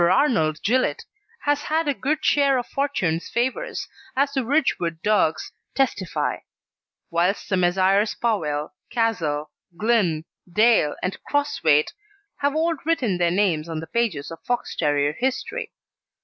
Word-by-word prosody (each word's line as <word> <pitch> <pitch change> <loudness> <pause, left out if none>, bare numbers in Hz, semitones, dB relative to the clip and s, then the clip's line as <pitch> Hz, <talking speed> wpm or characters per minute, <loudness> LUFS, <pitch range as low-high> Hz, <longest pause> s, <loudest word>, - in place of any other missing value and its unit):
Arnold 160 - +2
Gillett 255 +4 +1 0.4
has 290 0 +1
had 315 +1 0
a 290 - +2
good 300 +4 -2
share 280 -2 +4
of 245 - -2
fortune's 190 - -1
favours, 260 - -2 0.3
as 280 +1 +1
the 265 -2 0
Ridgewood 225 - 0
dogs 205 -7 +1 0.2
testify; 240 - 0 0.7
whilst 175 +4 0
the 195 - +2
Messrs. 190 +3 +2
Powell, 155 -11 -1 0.2
Castle, 160 -11 -1 0.3
Glynn, 195 -8 +1 0.3
Dale, 215 -6 +4
and 185 - -3
Crosthwaite 285 - +2 0.4
have 285 +1 0
all 330 +2 +2
written 255 - 0
their 175 -1 +3
names 170 -4 +1
on 160 -1 -3
the 160 - -6
pages 185 -8 -1
of 165 - -9
Fox 245 0 -2
terrier 145 -1 +1
history. 265 - -2
210 Hz, 135 wpm, -23 LUFS, 165-275 Hz, 0.7 s, share